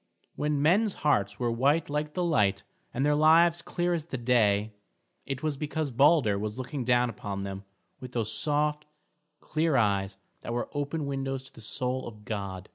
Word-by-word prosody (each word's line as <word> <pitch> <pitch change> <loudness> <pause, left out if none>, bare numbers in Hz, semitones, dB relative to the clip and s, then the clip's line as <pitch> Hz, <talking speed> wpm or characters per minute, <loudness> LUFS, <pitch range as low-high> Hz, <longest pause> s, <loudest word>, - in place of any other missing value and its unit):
When 150 -1 0
men's 200 +6 +3
hearts 100 -9 +2
were 120 -2 0
white 140 +7 +2
like 150 +1 -3
the 180 - 0
light, 105 - +2 0.3
and 135 +3 -1
their 150 - +3
lives 165 +3 +5
clear 175 +1 -1
as 160 -3 -2
the 140 - -5
day, 110 -4 +2 0.5
it 135 0 -4
was 150 -3 -1
because 150 0 -3
Balder 135 -5 +4
was 105 +2 -4
looking 130 +1 -4
down 125 0 +3
upon 100 -3 -5
them 100 0 -6 0.3
with 125 -1 -9
those 110 -2 0
soft, 150 0 0 0.5
clear 155 -1 0
eyes 100 -3 +1 0.2
that 120 - -5
were 120 - -3
open 145 +1 -2
windows 135 -1 -3
to 135 - -15
the - - -13
soul 125 +4 -2
of 105 -2 -11
God. 100 -3 -5
135 Hz, 180 wpm, -28 LUFS, 110-150 Hz, 0.5 s, lives